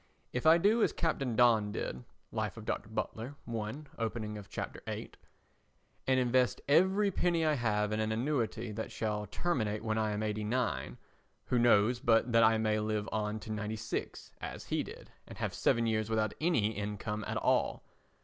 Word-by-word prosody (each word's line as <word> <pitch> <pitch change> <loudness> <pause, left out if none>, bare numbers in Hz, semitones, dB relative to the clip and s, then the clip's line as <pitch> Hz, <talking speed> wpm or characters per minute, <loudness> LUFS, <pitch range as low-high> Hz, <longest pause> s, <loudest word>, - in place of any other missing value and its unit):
If 125 +5 0
I 160 +1 +8
do 210 +6 +3
as - - +3
Captain 135 -8 -1
Don 110 -3 +4
did 65 -10 -4 0.3
[Life - - -2
of - - -8
Dr. - - -3
Butler, 120 +6 -4
I, 110 -2 -2 0.3
opening 110 -1 -2
of 105 -2 -9
Chapter - - -5
VIII], - - -4 1.0
and 130 -1 +4
invest 125 0 +2
every 190 +7 +4
penny 170 -3 +1
I 155 - +3
have 105 -5 +1
in 110 - 0
an 110 0 0
annuity 120 -2 -1
that 110 +1 -5
shall 105 -1 -2
terminate 110 - -1
when 110 -1 0
I 110 -1 +1
am 105 +1 -2
89, 110 +3 -1 0.5
who 125 - +1
knows 120 0 +4
but 115 +1 +3
that 115 0 +6
I 110 0 +5
may 110 -1 +1
live 105 0 -1
on 105 0 -1
to 110 - -7
96, 110 +1 -4
as - - -6
he - - 0
did, - - -10 0.2
and - - -10
have - - -2
seven 115 0 +2
years 110 -1 0
without 110 -2 +1
any 140 -11 +2
income 105 +1 -4
at - - -2
all? - - +1
110 Hz, 180 wpm, -32 LUFS, 105-125 Hz, 1.0 s, I